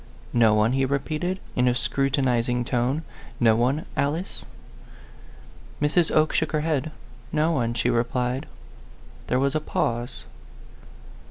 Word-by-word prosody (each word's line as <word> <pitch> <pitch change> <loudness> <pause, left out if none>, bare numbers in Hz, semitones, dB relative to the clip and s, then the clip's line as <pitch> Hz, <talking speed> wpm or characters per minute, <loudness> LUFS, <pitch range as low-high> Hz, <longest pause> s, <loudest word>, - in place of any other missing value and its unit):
"No 115 -3 +5
one?" 105 +2 +3
he 135 +1 +1
repeated, 155 +7 -1 0.2
in 125 0 +3
a 125 - +3
scrutinizing 125 -3 +1
tone; 125 +6 0 0.2
" - - -19
no 110 - +6
one, 130 +7 +1
Alice 155 +6 -1 0.6
?" - - -21
Mrs. 155 +3 +2
Oke 155 0 +3
shook 160 0 0
her 155 - +1
head. 155 -1 0 0.2
" - - -22
No 160 +2 +3
one," 120 -6 0
she 120 +1 +1
replied. 125 +2 -1 0.8
There 125 - +1
was 135 +1 +1
a 155 - 0
pause. 120 -4 -2
130 Hz, 145 wpm, -25 LUFS, 120-155 Hz, 0.8 s, no